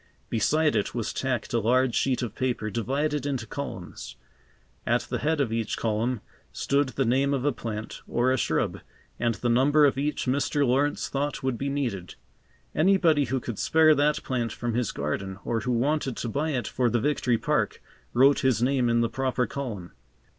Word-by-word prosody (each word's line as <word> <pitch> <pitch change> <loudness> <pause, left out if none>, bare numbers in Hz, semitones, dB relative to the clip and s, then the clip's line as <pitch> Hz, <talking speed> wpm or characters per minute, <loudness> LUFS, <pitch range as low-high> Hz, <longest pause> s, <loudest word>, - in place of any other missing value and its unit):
Beside 155 +8 +2
it 100 - -1
was 115 -3 -2
tacked 130 -4 -2
a 120 - +3
large 125 +3 +2
sheet 130 -2 +1
of 115 - -4
paper, 120 -4 -2
divided 140 +6 -1
into 130 -5 -2
columns. 110 -10 -7 0.7
At - - +1
the - - -4
head 160 +1 0
of 125 -6 0
each 115 -2 -2
column 115 +1 -1 0.3
stood 140 0 0
the 135 0 -1
name 135 +4 +2
of 135 0 -2
a 145 - +3
plant 110 -3 -6
or 120 +2 +1
a 130 - +2
shrub, - - 0 0.4
and 120 -2 +1
the 120 - -3
number 145 +5 +5
of 135 -1 +2
each 150 +2 -1
Mr. 140 +2 +1
Lawrence 140 +4 +1
thought 140 0 -2
would 130 -2 0
be 140 +4 -3
needed. 120 - -3 0.6
Anybody 160 -4 +3
who 130 0 -1
could 120 -3 -6
spare 160 -1 +5
that 150 +1 +1
plant 120 -3 -2
from 120 -1 -3
his 120 -2 0
garden 95 +7 -3
or 115 - 0
who 125 +3 -2
wanted 135 +2 0
to 120 - -3
buy 145 +7 -1
it 130 -5 -2
for 125 -1 +1
the 120 - +1
Victory 125 -2 +1
Park, - - 0 0.3
wrote 135 +3 +5
his 130 -5 +2
name 125 0 +2
in 115 0 +3
the 115 - +2
proper 130 0 0
column. 115 -12 -5
130 Hz, 190 wpm, -26 LUFS, 115-140 Hz, 0.7 s, number